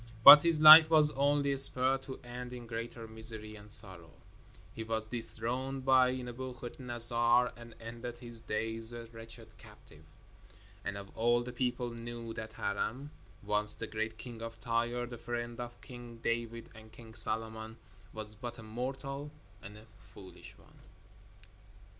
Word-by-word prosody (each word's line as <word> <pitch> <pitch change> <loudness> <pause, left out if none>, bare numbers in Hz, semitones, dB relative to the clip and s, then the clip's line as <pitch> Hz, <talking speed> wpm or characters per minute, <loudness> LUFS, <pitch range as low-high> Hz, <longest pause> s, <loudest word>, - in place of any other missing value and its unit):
But 145 - +12
his 165 -1 +2
life 155 +1 +10
was 155 -2 +5
only 140 0 0
spared 135 0 +6
to 130 - -8
end 125 0 -9
in 120 -1 -9
greater 115 0 -7
misery 110 -1 -8
and 105 0 -14
sorrow. 95 -6 +4 0.6
He 110 - -7
was 110 0 -4
dethroned 125 +3 -5
by 130 -1 +3
Nebuchadnezzar 120 -1 0
and 120 -1 -14
ended 120 +1 -9
his 120 -2 -11
days 115 +1 0
a 120 -1 -8
wretched 115 -1 -12
captive. 80 -3 -18 0.8
And 100 - -5 0.2
all 120 +1 +1
the 125 0 -9
people 125 -1 -3
knew 115 0 -8
that 110 -1 -8
Hiram, 125 +9 -4 0.3
once 105 0 +2
the - - -6
great 110 0 -5
king 115 0 -10
of 115 0 -8
Tyre, 120 +2 -2
the 120 -1 -10
friend 120 0 -6
of 120 0 -8
King 120 -2 -12
David 115 0 -4
and 110 0 -16
King 115 -1 -15
Solomon, 110 0 -1 0.3
was 110 -1 -6
but 120 +2 -8
a 115 - -11
mortal 135 +5 -6 0.3
and 105 +2 -12
a 110 - -16 0.3
foolish 95 -2 -14
one. - - -22
120 Hz, 145 wpm, -31 LUFS, 110-125 Hz, 0.8 s, But